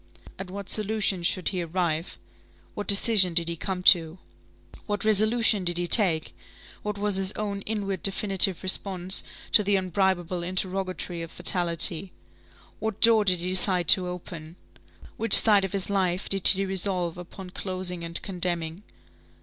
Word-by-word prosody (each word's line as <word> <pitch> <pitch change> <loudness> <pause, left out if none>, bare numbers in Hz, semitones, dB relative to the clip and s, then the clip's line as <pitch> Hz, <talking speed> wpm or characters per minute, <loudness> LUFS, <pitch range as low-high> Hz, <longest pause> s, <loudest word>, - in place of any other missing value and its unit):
At 190 -1 -9
what 200 +1 -9
solution 210 -3 -1
should 175 +1 -2
he 185 -2 -5
arrive? 170 -1 -4 0.6
What 205 - -8
decision 200 -3 +5
did 170 -1 -1
he 170 - -4
come 180 +2 -6
to? 165 -1 -11 0.7
What 205 0 -4
resolution 215 0 +1
did 175 -1 -3
he 175 - -3
take? 175 -5 +3 0.5
What 210 -1 -6
was 205 -1 -2
his 195 +1 +2
own 200 -2 -6
inward 200 -4 -5
definitive 195 -2 +1
response 185 0 +1 0.3
to 215 - +5
the 205 0 -1
unbribable 185 -1 -3
interrogatory 185 -1 -5
of 165 - -9
fatality? 175 +1 0 0.7
What 220 -2 -6
door 225 -2 +4
did 180 -3 -1
he 180 - -5
decide 180 -2 -1
to 185 -2 +4
open? 170 -2 -10 0.6
Which 230 - +6
side 205 -3 +8
of 190 - -8
his 195 -2 -2
life 190 -2 -3
did 195 -2 +1
he 195 +1 +7
resolve 185 -3 -3
upon 180 +1 -12
closing 185 -2 -6
and 170 0 -1
condemning? 175 -2 -4
185 Hz, 150 wpm, -23 LUFS, 175-200 Hz, 0.7 s, side